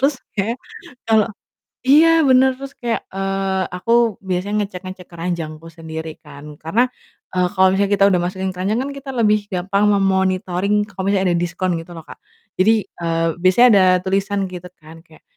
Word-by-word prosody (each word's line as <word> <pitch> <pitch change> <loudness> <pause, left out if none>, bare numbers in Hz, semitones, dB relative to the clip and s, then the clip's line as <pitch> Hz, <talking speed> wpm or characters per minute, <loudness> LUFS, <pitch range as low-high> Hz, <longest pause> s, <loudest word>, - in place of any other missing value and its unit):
terus 275 +1 +3 0.2
kayak, 220 +5 -2 0.5
kalo 220 -2 +4 0.6
iya, 305 +4 +7 0.2
bener, 260 +1 +6
terus 275 +1 -9
kayak, 235 -2 -2
eee, 195 0 -1
aku 180 +5 -5 0.4
biasanya 185 +3 -2
ngecek-ngecek 185 -1 -8
keranjangku 165 -2 -5
sendiri 160 0 -6
kan, 150 0 -11
karena, 180 +10 +2 0.5
eee, 180 -1 +2
kalau 190 -2 +4
misalnya 200 +1 +1
kita 195 0 +3
udah 180 -2 +2
masukin 190 +2 -3
keranjang 195 +5 -1
kan, 275 - -4
kita 275 0 -8
lebih 215 -2 +4
gampang 195 +2 0
me-monitoring 190 -1 +1
kalau 190 -2 -7
misalnya 195 -1 +1
ada - - +2
diskon, 175 +1 -2
gitu 165 - -17
loh, 165 -2 -10
Kak, - - -12 0.4
jadi, 210 +5 +5 0.3
eee, 165 0 0 0.2
biasanya 185 +7 +6
ada 195 - +6 0.2
tulisan 195 +1 0
gitu 180 -1 -9
kan, 160 +1 -14
kayak 160 -2 -21
190 Hz, 165 wpm, -19 LUFS, 175-205 Hz, 0.6 s, iya